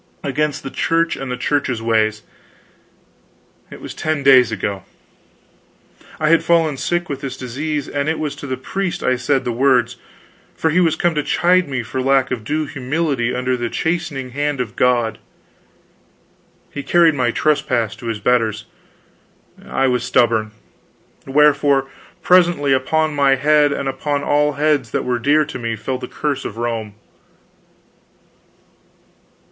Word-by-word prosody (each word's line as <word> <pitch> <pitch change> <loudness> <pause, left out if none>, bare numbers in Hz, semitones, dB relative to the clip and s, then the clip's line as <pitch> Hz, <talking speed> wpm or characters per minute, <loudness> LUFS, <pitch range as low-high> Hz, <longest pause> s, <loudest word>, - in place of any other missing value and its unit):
against 150 +2 -1
the 135 - -6
Church 165 0 0
and 135 - -6
the 125 - -3
Church's 130 -2 -1
ways. 110 -1 0 1.5
It - - -11
was - - -7
ten 155 -2 -2
days 130 -3 +6
ago. 100 -2 -3 1.4
I 155 - +1
had 165 - +4
fallen 165 -4 +2
sick 175 +5 -1
with 140 -1 -5
this 135 -2 -5
disease, 140 +4 -4
and 145 +1 -2
it 160 - -1
was 150 -2 -3
to 145 - -8
the 130 -1 -3
priest 185 +7 -4
I 130 - +2
said 130 +2 0
the 120 - -1
words, 120 -1 +2 0.6
for 160 - 0
he 175 - +2
was 165 -3 +3
come 175 -1 +1
to 150 - 0
chide 180 +2 +2
me 130 -3 -2
for 130 +3 -4
lack 135 0 +2
of 120 -4 -3
due 155 +7 -1
humility 135 -2 -2
under 125 0 0
the 120 -1 -3
chastening 160 -6 -3
hand 145 +1 -2
of 120 -2 -4
God. 120 -3 +1 1.5
He 145 - -5
carried 165 +3 +4
my 125 -4 0
trespass 125 -5 0
to 120 - -8
his 110 -2 -3
betters; 110 -1 0 1.0
I 135 - -1
was 125 -2 +1
stubborn; 115 -3 +2 0.8
wherefore, 140 -1 +3 0.3
presently 175 -6 +4
upon 155 +4 +1
my 140 -2 +3
head 145 +2 +3
and 140 - -3
upon 140 +2 -2
all 150 0 +2
heads 145 -4 +1
that - - -2
were 125 -1 -1
dear 150 +4 +3
to 150 - -7
me, 115 -1 -3
fell 125 +4 -4
the - - -6
curse 145 -2 -3
of 110 - -7
Rome. 115 -3 -3
135 Hz, 155 wpm, -19 LUFS, 125-150 Hz, 1.5 s, days